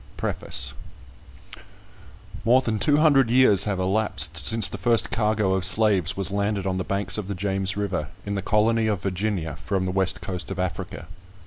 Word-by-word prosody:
PREFACE - - -1 1.7
MORE 125 +3 +4
than 110 -4 -2
two 145 +8 +2
hundred 140 -6 +3
years 115 -6 +5
have 105 -3 -2
elapsed 95 -5 +1
since 100 +7 +2
the 100 - -7
first 115 +4 +2
cargo 105 -3 0
of 95 -1 -1
slaves 95 -2 +3
was 95 -1 -3
landed 100 -1 -2
on 95 -1 -2
the - - -2
banks 100 +1 -2
of 100 - -6
the 100 - -4
James 95 +1 -2
River, 100 -7 -3 0.2
in 100 - -4
the 100 - -3
colony 110 +3 +1
of 105 -4 -2
Virginia, 95 -5 -3
from 95 0 -2
the 90 - -2
West 95 -3 0
coast 90 +1 -5
of 95 - -6
Africa. 95 -1 -5
100 Hz, 180 wpm, -23 LUFS, 95-110 Hz, 1.7 s, years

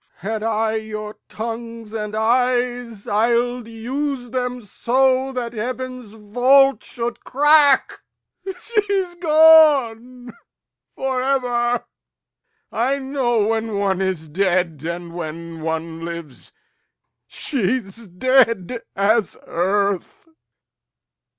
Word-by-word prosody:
Had 215 +3 -4
I 220 0 0
your 215 -1 -7
tongues 230 0 -6
and 210 -1 -4
eyes, 245 -1 0
I'ld 235 +3 +1
use 245 +2 -4
them 250 -1 -3
so 260 +5 +1
That 245 -2 -4
heaven's 250 0 -5
vault 255 +6 +3
should 240 0 -5
crack. 290 0 +4 0.6
She's 400 -5 -1
gone 285 -8 +4 0.6
for 265 -1 -2
ever! 245 -2 0 0.9
I 260 +5 0
know 265 -5 0
when 225 -1 -1
one 195 -2 0
is 185 -4 -2
dead, 175 -2 0
and 170 +1 -5
when 165 0 -7
one 160 +1 -4
lives. 170 -5 -8 0.8
She's 230 -3 -3
dead 230 +1 +2
as 210 +2 +1
earth. 200 - -1
230 Hz, 95 wpm, -21 LUFS, 205-255 Hz, 0.9 s, crack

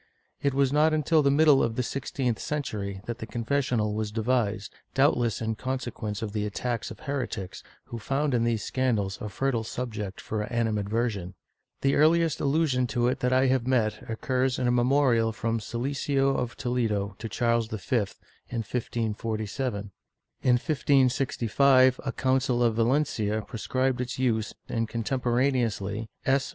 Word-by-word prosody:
It 140 -1 +1
was 140 0 +2
not 155 +1 +4
until 155 +1 +3
the 140 - +3
middle 145 -1 +5
of 115 -1 0
the 125 - 0
sixteenth 125 -2 -2
century 100 -10 -3
that 120 +1 -5
the 110 - -6
confessional 120 -3 0
was 105 0 -2
devised, 110 -3 0 0.2
doubtless 125 -5 +2
in 110 0 0
consequence 115 -3 -4
of 105 -2 -4
the 105 -1 -1
attacks 115 +2 -3
of 110 - -10
heretics, 125 -9 -4 0.2
who 115 - -7
found 135 +5 0
in 120 -1 +2
these 115 -3 0
scandals 110 -7 -1
a 105 - -4
fertile 120 +3 -1
subject 110 -5 -5
of 105 -1 -2
animadversion. 110 -4 -1 0.5
The 135 0 +2
earliest 165 +1 +3
allusion 140 -3 +2
to 120 0 +1
it - - -2
that 125 - +1
I 130 +1 +4
have 130 -2 +1
met 115 -5 +1
occurs 130 +3 0
in 125 - 0
a - - +3
memorial 120 -2 +3
from 115 +1 -2
Siliceo 135 +4 0
of 125 -1 -3
Toledo 110 -6 -1
to 115 - -5
Charles 115 0 +1
V, 110 +4 -3 0.5
in 115 -2 -2
1547.^ 110 -1 -3 0.5
In 125 -1 +4
15G5 130 -1 +3
a 135 - -2
Council 130 -1 +1
of 115 -2 +3
Valencia 115 -3 +1
prescribed 130 +3 -1
its 125 0 -4
use 115 -4 0
and 115 -2 -2
contemporaneously 120 -3 0 0.2
S. 135 0 +2
120 Hz, 150 wpm, -27 LUFS, 110-135 Hz, 0.5 s, middle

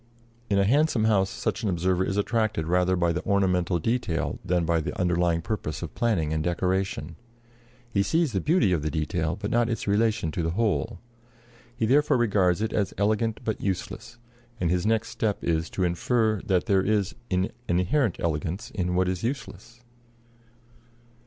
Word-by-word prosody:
In 100 - +2
a 100 - +3
handsome 135 0 +3
house 100 -3 +3
such - - -3
an 110 - 0
observer 90 +1 +1
is 95 +1 -2
attracted 110 -5 0
rather 90 +2 +2
by 85 -1 +1
the 85 - -3
ornamental 90 -3 +1
detail 90 -3 -1
than 90 -1 +1
by 85 0 +1
the 80 - -5
underlying 85 -2 +1
purpose 95 -8 -4
of - - -6
planning 90 -10 0
and 80 -1 -1
decoration. 90 -2 -1 0.8
He 100 - +3
sees 160 +7 +1
the 95 - -1
beauty 150 - +3
of 85 -4 +1
the 75 - -1
detail, 80 +1 -1
but 105 - -3
not 120 0 +2
its 115 - -3
relation 105 -4 +1
to 85 - -2
the 80 - -1
whole. 110 -1 0 0.8
He 115 - 0
therefore 145 +4 +3
regards 100 -5 +2
it 110 - -2
as 100 -2 -1
elegant 110 +2 0
but 110 - -2
useless; 100 +5 -4 0.4
and 85 -2 +1
his 90 +3 0
next 110 0 +1
step 105 -3 -2
is 80 -1 0
to 95 - -2
infer 110 +4 +1
that 90 -2 +2
there 95 -1 +3
is 100 -1 0 0.2
an 95 +1 0 0.2
inherent 95 - +1
elegance 85 +7 -2
in 90 -2 -2
what 90 0 +2
is 90 -1 -2
useless. 115 -2 -5
95 Hz, 175 wpm, -26 LUFS, 85-110 Hz, 0.8 s, a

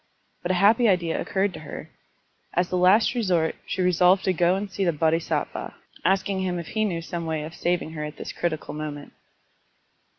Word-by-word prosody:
But 175 - -4
a 185 - +2
happy 220 +6 +5
idea 170 -4 +1
occurred 195 0 0
to 155 - -8
her. 155 - -9 0.6
As 175 +1 +2
the - - -1
last 185 +6 +5
resort 180 -9 +1
she 185 - -1
resolved 180 +1 +4
to 190 - +2
go 175 +1 +3
and 200 +2 -3
see 195 +1 -2
the 175 - +3
Bodhisattva, 160 +1 -1 0.3
asking 190 +1 +1
him 180 -1 -1
if 170 -2 -6
he 215 0 0
knew 170 -5 -2
some 170 0 -4
way 160 -1 -2
of 160 +2 -7
saving 175 -2 -1
her 155 -1 -5
at 150 0 -6
this - - -6
critical 165 -3 -3
moment. 150 -1 -6
175 Hz, 195 wpm, -25 LUFS, 160-190 Hz, 0.6 s, happy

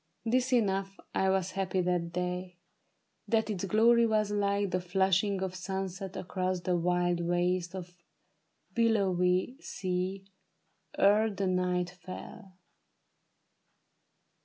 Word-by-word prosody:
'Tis 255 +2 +2
enough 195 -5 +1
I 190 - +2
was 190 -1 +1
happy 190 -1 -1
that 175 -1 0
day; 180 0 -3 0.7
that 220 0 +1
its 195 -2 -3
glory 230 +3 +5
was 215 -2 +1
like 200 -1 0
The 180 0 0
flushing 190 +2 +1
of 185 -1 -3
sunset 190 0 -4
across 185 0 -2
the 180 +1 0
wild 175 0 +1
waste 175 +1 0
Of 180 -2 -6
a 175 0 -37
billowy 195 -1 +2
sea 185 - -3 0.7
ere 210 +3 +5
the 200 -1 -2
night 180 -1 0
fell. 185 +2 -10
185 Hz, 115 wpm, -30 LUFS, 180-200 Hz, 0.7 s, glory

